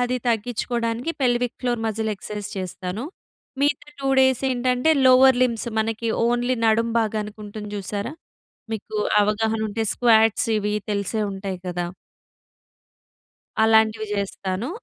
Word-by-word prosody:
అది 245 +1 +1
తగ్గించుకోవడానికి 235 +3 -1
pelvic 245 -1 +1
floor 240 -2 -1
muscle 220 0 -1
exercise 210 +1 -6
చేస్తాను. 185 +3 -4 0.6
మిగతా 290 0 0
2 275 - -1
డేస్ 260 -1 +3
ఏంటంటే, 250 +3 +1 0.2
లోవర్ 255 0 +7
లింబ్స్ 235 -2 0
మనకి 225 +1 -2 0.2
ఓన్లీ 245 +1 +1
నడుం 225 +1 +3
భాగానికి 215 -1 -3
ఉంటుంది 210 0 -7
జూసారా? 205 +6 -4 0.6
మీకు 215 0 -6 0.3
అవగాహన 220 +2 0
ఉంటే 225 +2 -2
స్క్వాట్స్ 225 -2 +4
ఇవి 210 0 -1 0.2
తెలిసే 205 +2 -1
ఉంటాయి 195 -1 -5
గదా! 175 0 -2 1.8
అలాంటివి 220 0 +3
జేస్తాను. 195 +2 -3
225 Hz, 115 wpm, -23 LUFS, 210-245 Hz, 1.8 s, లోవర్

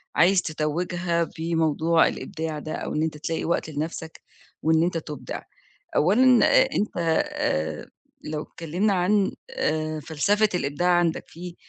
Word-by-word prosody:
عايز 185 +2 +5
تتوّجها 170 +2 -1 0.2
بموضوع 165 0 +2
الإبداع 160 -4 -4
ده 155 - -6
أو - - -4
إن 155 - +1
أنت 155 -2 -2
تلاقي 165 +1 -3
وقت 170 -1 -1
لنَفْسك 160 +2 -5 0.4
وإن 160 +1 +3
أنت 170 -1 0
تُبدع. 150 -3 -6 0.5
أولًا 240 - +5
آآ - - +6
أنت 210 - -1 0.4
آآ 80 0 -2 0.3
لو 150 0 -4
اتكلِّمنا 180 +6 -1
عن 190 +2 +2 0.2
آآ 155 0 -1
فلسفة 200 +8 +1
الإبداع 145 +2 0
عندك، 175 -2 +2
في 175 +1 -9
165 Hz, 135 wpm, -25 LUFS, 155-180 Hz, 0.5 s, آآ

